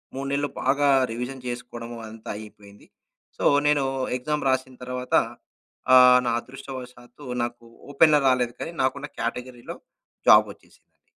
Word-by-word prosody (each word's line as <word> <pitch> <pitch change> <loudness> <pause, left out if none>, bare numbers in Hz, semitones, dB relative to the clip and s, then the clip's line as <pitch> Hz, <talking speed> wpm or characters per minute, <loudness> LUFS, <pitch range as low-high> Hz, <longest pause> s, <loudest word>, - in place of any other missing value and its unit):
3 135 +1 -4
నెలలు 145 +1 0
బాగా 140 +2 +2 0.2
రివిజన్ 125 +3 -6
చేసుకోడము, 120 -1 -7
అదంతా 110 0 -11
అయిపోయింది. 105 -1 -14 0.5
సో, - - -5 0.2
నేను 145 -2 +3 0.3
ఎగ్జామ్ 150 +4 -2
రాసిన 130 0 -1
తర్వాత 125 0 -6 0.8
ఆహ్, 125 0 +8
నా 120 - +1
అదృష్టవశాతు 125 0 -11 0.2
నాకు 120 0 -6 0.3
ఓపెన్‌గా 150 +1 +5
రాలేదు 125 -2 +2
కానీ, 165 - -5
నాకున్న 140 +2 -1
కేటగిరీలో 120 +1 -5 0.5
జాబొచ్చేసిందండి. - - +2
125 Hz, 120 wpm, -24 LUFS, 120-135 Hz, 0.8 s, ఆహ్